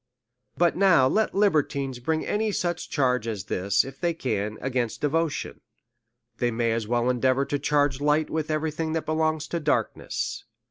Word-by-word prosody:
But 175 -1 +3
now 180 -9 +5
let 220 +10 +1
libertines 140 -9 +1
bring 160 +5 -1
any 215 +1 0
such 175 -3 -2
charge 125 -5 +1
as 105 -4 -3
this, 100 0 +1
if 135 0 -10
they 170 -1 0
can, 105 -7 -2
against 125 -3 -2
devotion. 155 +1 -1 0.8
They 120 - +2
may 115 0 0
as 115 -1 -2
well 120 +1 +1
endeavour 130 +2 +2
to 145 - -2
charge 145 -2 +1
light 150 +1 +2
with 155 -1 -2
every 155 0 0
thing 160 +1 -3
that 160 - -2
belongs 155 -1 0
to 170 - -1
dark 150 - 0
ness. - - -4
145 Hz, 175 wpm, -26 LUFS, 125-160 Hz, 0.8 s, now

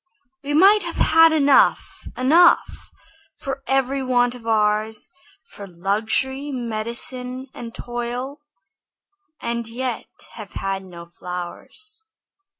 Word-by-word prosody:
We 290 +1 -2
might 400 +6 +6
have 340 -2 -5
had 325 0 +6
enough, 285 -3 +3
enough 320 +8 +4 0.5
For 275 0 -5
every 270 0 +1
want 245 -1 +2
of 240 -2 -11
ours, 215 +3 +1 0.3
For 200 - -10
luxury, 220 +10 -1
medicine, 250 +2 -4
and 235 -1 -8
toil, 245 +4 -5 1.0
And 235 -1 -3
yet 245 +1 -4 0.2
have 215 -4 -10
had 195 0 -3
no 170 -2 -11
flowers. 180 - -8
245 Hz, 105 wpm, -22 LUFS, 215-275 Hz, 1.0 s, might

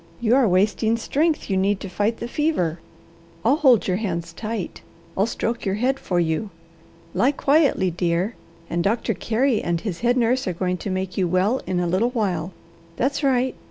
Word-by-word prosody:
You 235 -1 +2
are 265 -3 +4
wasting 210 +4 +2
strength 300 +7 0
you 195 - 0
need 195 +1 +1
to - - -5
fight 210 +4 -1
the 235 - -5
fever. 240 - 0 0.7
I'll 285 - +4
hold 260 - +4
your 185 -1 +1
hands 170 -5 -3
tight, 215 -2 -5 0.3
I'll 200 +3 +2
stroke 230 0 -2
your 195 -1 0
head 260 +5 0
for 180 -2 -1
you. 165 +5 0 0.6
Lie 270 +4 +3
quietly, 280 - +2
dear, 175 +5 0 0.3
and 170 0 -1
Doctor 225 +3 0
Carey 230 +4 +1
and 170 -1 -1
his 195 -6 -4
head 245 +1 +2
nurse 250 0 +1
are 180 - 0
going 180 +1 -1
to 200 - -5
make 185 0 -3
you 185 - +2
well 190 +8 +1
in 180 -1 0
a 175 - 0
little 185 +8 +1
while. 190 -8 -1 0.4
That's 275 - 0
right! 260 -2 +2
210 Hz, 190 wpm, -23 LUFS, 180-245 Hz, 0.7 s, are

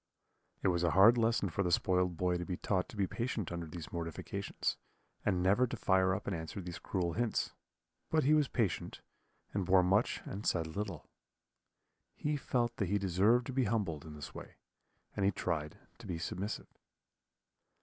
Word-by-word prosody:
"It - - +4
was 85 -1 +1
a 85 - +4
hard 110 +5 +9
lesson 115 -5 +2
for 100 - -1
the 90 -2 +1
spoiled 90 0 +2
boy 90 0 +1
to - - -2
be 90 0 -3
taught 95 -2 0
to - - -10
be 100 - +2
patient 115 -2 -3
under 85 -1 -4
these 80 -3 -8
mortifications, 85 +3 -3 0.5
and 90 -1 +1
never 105 +7 +4
to 120 - -5
fire 95 -2 +3
up - - -5
and 100 - -1
answer 80 +4 -5
these 90 -2 -6
cruel 90 -3 -1
hints; 120 +2 0 0.6
but 160 -1 +3
he 145 +4 +4
was 150 -2 +4
patient, 110 -10 -1 0.5
he 100 - 0
bore 95 0 +4
much 100 +6 +2
and 100 +2 -5
said 80 -2 +2
little. 100 -6 -4 1.1
He 150 0 -1
felt 120 -4 0
that 100 -5 -1
he 100 - +2
deserved 100 +6 +3
to 130 - -5
be 130 -1 +2
humbled 95 -9 -1
in 75 -1 -9
this 75 - -8
way, - - -9 0.6
and 100 - -1
he 100 - +4
tried 75 -4 -2 0.2
to 115 - -10
be 90 -3 -2
submissive. 95 +5 -5
95 Hz, 185 wpm, -34 LUFS, 85-110 Hz, 1.1 s, hard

